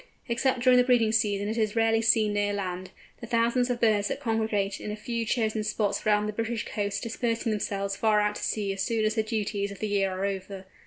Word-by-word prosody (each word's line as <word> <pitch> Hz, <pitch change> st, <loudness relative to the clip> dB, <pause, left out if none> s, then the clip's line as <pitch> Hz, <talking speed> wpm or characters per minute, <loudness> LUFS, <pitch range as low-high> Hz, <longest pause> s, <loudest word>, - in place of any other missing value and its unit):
Except 245 Hz, +1 st, 0 dB
during 255 Hz, 0 st, +5 dB
the -, -, +6 dB
breeding 245 Hz, -3 st, +3 dB
season 205 Hz, -2 st, +1 dB
it 220 Hz, +2 st, -2 dB
is 215 Hz, -1 st, 0 dB
rarely 225 Hz, 0 st, +3 dB
seen 220 Hz, -2 st, +3 dB
near 205 Hz, 0 st, 0 dB
land, 185 Hz, -2 st, -4 dB, 0.3 s
the 235 Hz, -, -8 dB
thousands 235 Hz, +2 st, +1 dB
of 245 Hz, -1 st, -1 dB
birds 215 Hz, -3 st, +3 dB
that -, -, -3 dB
congregate 220 Hz, -5 st, -1 dB
in -, -, -5 dB
a -, -, -3 dB
few 230 Hz, +2 st, -3 dB
chosen 220 Hz, -2 st, 0 dB
spots 210 Hz, -1 st, -1 dB
round 210 Hz, 0 st, +3 dB
the 210 Hz, -, -3 dB
British 230 Hz, +1 st, -2 dB
coasts 205 Hz, -2 st, -2 dB
dispersing 230 Hz, 0 st, -2 dB
themselves 200 Hz, -1 st, -2 dB
far 215 Hz, +1 st, +2 dB
out 210 Hz, 0 st, +1 dB
to -, -, -7 dB
sea 200 Hz, -2 st, -1 dB
as 195 Hz, -, -4 dB
soon 225 Hz, -1 st, 0 dB
as 215 Hz, -, +1 dB
the 220 Hz, -, +1 dB
duties 210 Hz, -2 st, -2 dB
of 200 Hz, -, -9 dB
the 215 Hz, -, -3 dB
year 200 Hz, -1 st, +1 dB
are 190 Hz, +1 st, -3 dB
over. 195 Hz, -1 st, -5 dB
215 Hz, 230 wpm, -27 LUFS, 205-230 Hz, 0.3 s, the